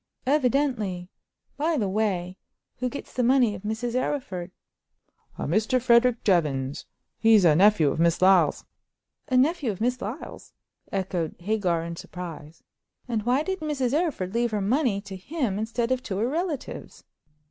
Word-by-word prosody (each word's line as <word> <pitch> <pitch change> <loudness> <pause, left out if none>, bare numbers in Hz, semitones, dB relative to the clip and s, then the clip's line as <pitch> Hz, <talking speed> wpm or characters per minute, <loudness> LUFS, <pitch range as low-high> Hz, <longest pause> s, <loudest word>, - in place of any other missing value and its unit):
"Evidently. 250 -10 0 0.5
By 315 +2 +1
the 210 -6 0
way, 190 -3 -1 0.4
who 250 0 -1
gets 280 - -8
the 255 - 0
money 245 -2 +4
of 190 - -8
Mrs. 220 +3 -3
Arryford?" 250 -9 -2 0.9
"A - - -3
Mr. 220 - +1
Frederick 240 -1 +3
Jevons; 145 -8 0 0.3
he's 220 -4 +5
a 155 -3 +6
nephew 180 -5 +5
of - - -4
Miss 170 0 +3
Lyle's." 185 -5 +4 0.6
"A 255 -3 +2
nephew 285 0 +2
of 190 - -8
Miss 245 +2 0
Lyle's!" 225 +9 -7 0.4
echoed 185 -4 -2
Hagar, 180 -3 0
in 170 0 -5
surprise. 165 -4 -9 0.4
"And 230 -3 -1
why 260 +4 +3
did 380 +2 -3
Mrs. 280 -5 -1
Arryford 290 - -1
leave 235 +1 +1
her 215 -2 -1
money 215 0 +1
to 200 -1 -9
him 215 - -3
instead 230 +2 -2
of 255 -1 +1
to 200 -7 -4
her 220 +4 +1
relatives?" 320 +1 -4
220 Hz, 155 wpm, -26 LUFS, 185-255 Hz, 0.9 s, a